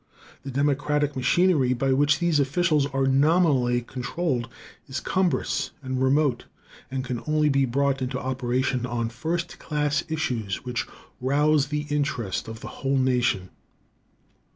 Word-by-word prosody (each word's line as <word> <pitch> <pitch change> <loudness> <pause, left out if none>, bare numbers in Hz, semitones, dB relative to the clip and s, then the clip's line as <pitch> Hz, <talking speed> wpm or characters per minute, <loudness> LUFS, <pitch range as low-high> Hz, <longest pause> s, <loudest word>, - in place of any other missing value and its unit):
The 135 - -7
democratic 145 +1 0
machinery 135 0 +3
by 135 +2 +1
which 145 +2 +3
these 170 -3 +2
officials 150 +1 +2
are 135 -1 0
nominally 135 -3 +3
controlled 125 0 -2 0.4
is 135 -1 -3
cumbrous 185 -2 0
and 130 0 -2
remote, 135 -1 +2 0.4
and 130 0 -3
can 125 -2 -3
only 150 0 +2
be 135 -1 +3
brought 135 +2 0
into 130 0 -2
operation 130 0 -1
on 115 -1 -2
first 165 +8 -3
class 150 -1 0
issues 120 -10 -2
which 125 -2 -2 0.3
rouse 145 +3 +2
the 150 +1 -2
interest 140 -10 -1
of 110 +1 -8
the - - -7
whole 135 0 +1
nation. 125 -8 +1
135 Hz, 135 wpm, -25 LUFS, 125-150 Hz, 0.4 s, machinery